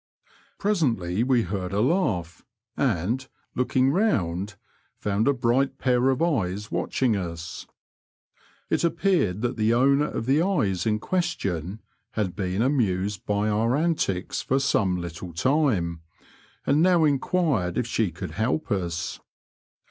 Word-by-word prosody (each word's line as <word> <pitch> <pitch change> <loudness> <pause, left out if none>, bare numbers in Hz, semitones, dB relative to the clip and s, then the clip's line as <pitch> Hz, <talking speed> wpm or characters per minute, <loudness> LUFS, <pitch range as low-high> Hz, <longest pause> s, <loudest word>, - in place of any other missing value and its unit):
Presently 120 - 0
we 125 -2 +3
heard 90 0 -4
a 100 - +1
laugh, 105 - 0 0.3
and, 120 +1 0 0.3
looking 130 +1 +2
round, 100 - 0 0.4
found 105 +3 0
a - - +6
bright 130 +2 +1
pair 125 0 +2
of 135 +4 +1
eyes 105 - -1
watching 125 -5 0
us. 85 -3 -5 1.0
It - - +1
appeared 170 - +1
that 120 - -1
the 110 +1 +2
owner 140 +4 +3
of 115 - -4
the 140 +5 +3
eyes 110 - 0
in 105 -1 +2
question 105 - -2 0.3
had 100 -5 -2
been 95 +2 -1
amused 105 -7 0
by 105 +1 +1
our 110 +4 +1
antics 150 - 0
for 135 - 0
some 100 -9 +1
liiitle 85 0 -7
time, 105 - +1 0.6
and 145 +3 +3
now 175 -2 +4
enquired 140 - +1
if 125 - +1
she 115 -3 0
could 85 +2 -7
help 125 +9 -1
us. 85 -5 -2
110 Hz, 135 wpm, -25 LUFS, 95-140 Hz, 1.0 s, a